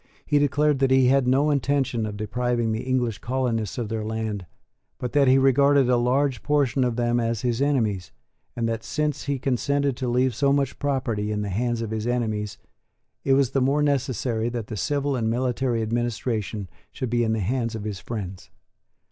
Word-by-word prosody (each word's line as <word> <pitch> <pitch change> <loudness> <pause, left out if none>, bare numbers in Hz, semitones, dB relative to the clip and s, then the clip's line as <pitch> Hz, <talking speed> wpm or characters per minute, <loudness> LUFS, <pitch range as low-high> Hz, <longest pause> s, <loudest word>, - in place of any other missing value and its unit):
He 145 - +3
declared 145 0 +2
that 135 -1 +3
he 130 -1 +5
had 135 -1 +3
no 140 +4 +3
intention 135 -4 0
of 105 -1 -6
depriving 120 +2 -1
the 110 - -2
English 125 -4 -1
colonists 120 -5 -2
of 120 -3 -2
their 110 0 -3
land, 110 -3 -3 0.5
but 125 - -4
that 145 -2 +4
he 130 +1 +6
regarded 135 0 +4
a - - +5
large 125 +1 +1
portion 140 -3 +1
of 120 -2 0
them 120 0 +1
as 115 -2 -1
his 120 0 0
enemies, 110 -10 0 0.4
and 115 -1 -1
that, 115 -1 -2
since 150 -2 -2
he 140 -1 -1
consented 140 +1 0
to 130 - -3
leave 125 +1 +2
so 140 +4 +2
much 140 -2 0
property 125 -7 -1
in 105 0 -1
the 100 - -3
hands 120 +4 -1
of 110 - -5
his 110 +1 -2
enemies, 110 -4 -1 0.7
it 135 - +3
was 135 -2 +3
the 135 - +1
more 140 +3 +2
necessary 130 -5 0
that 120 -2 -4
the 110 - -4
civil 140 +5 -1
and 115 -3 0
military 125 -1 0
administration 110 -3 -2 0.2
should 125 -3 -4
be 120 -1 +2
in 110 -1 +1
the 110 - -1
hands 115 +3 -1
of 110 - -5
his 105 -3 -4
friends. 100 -5 -6
120 Hz, 195 wpm, -24 LUFS, 110-135 Hz, 0.7 s, he